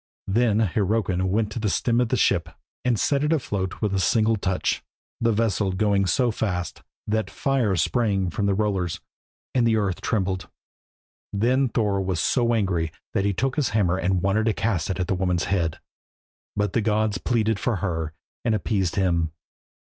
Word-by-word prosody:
Then 110 +1 +2
Hyrrokin 100 -2 +1
went 105 +2 0
to 115 - -4
the 110 -1 0
stem 120 +4 +1
of 120 - 0
the - - +1
ship, - - +2 0.3
and 120 -4 +1
set 140 0 +1
it 150 - +1
afloat 100 - -1
with 105 -2 +1
a 95 - +1
single 110 +3 +3
touch, 95 -3 -1 0.4
the 115 0 +2
vessel 105 -3 +1
going 100 0 +2
so 125 +4 +2
fast 90 -6 -3 0.2
that 110 +1 -1
fire 130 -8 0
sprang 95 +1 +1
from 100 +4 -1
the 100 - +2
rollers, 95 -5 -1 0.5
and 120 -2 +3
the 115 - +3
earth 100 -4 -1
trembled. 95 -4 -1 0.8
Then 125 +6 +2
Thor 105 -4 0
was 95 -3 -1
so 120 -2 +2
angry 90 -7 0 0.2
that 100 - +1
he 100 - +2
took 135 +7 -1
his 150 - +2
hammer 90 -3 +2
and 90 +1 0
wanted 105 +3 +2
to 110 - +3
cast 95 -7 -1
it 95 - -2
at 90 - +1
the 90 - -1
woman's 90 -2 0
head, 85 -4 -1 0.8
but 105 0 0
the 115 - +2
gods 105 -2 +1
pleaded 110 -2 +1
for 120 +1 0
her 80 -5 -3 0.3
and 115 -2 +2
appeased 95 -4 -1
him. 85 -4 +1
100 Hz, 180 wpm, -24 LUFS, 95-115 Hz, 0.8 s, single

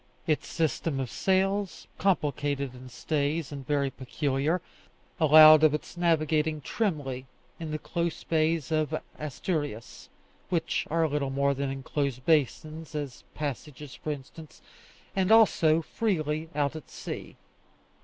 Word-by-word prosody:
Its 155 -2 0
system 160 -3 -1
of 130 -2 -3
sails, 195 0 0
complicated 145 -7 0
in 130 0 -11
stays, 145 +4 -1
and 140 -3 -7
very 140 -2 +1
peculiar, 140 +5 -1 0.6
allowed 155 0 +9
of 155 -1 +5
its 150 - -7
navigating 155 -2 +1
trimly 145 - -2 0.3
in 165 -1 -5
the 155 - -2
close 170 +1 -3
bays 160 -2 +1
of 155 0 0 0.2
Asturias 145 - -4 0.4
(which 165 -2 -1
are 165 0 +2
little 145 -2 -1
more 140 +1 +1
than 140 0 -2
enclosed 135 -1 -3
basins, 155 +1 0
as 145 -4 -5
Pasages, 145 -1 -5
for - - -6
instance), 150 +2 -8 0.6
and 190 +1 +2
also 165 -8 +5
freely 160 -7 -1
out 145 0 0
at 155 - -9
sea. - - -7
155 Hz, 125 wpm, -28 LUFS, 140-160 Hz, 0.6 s, allowed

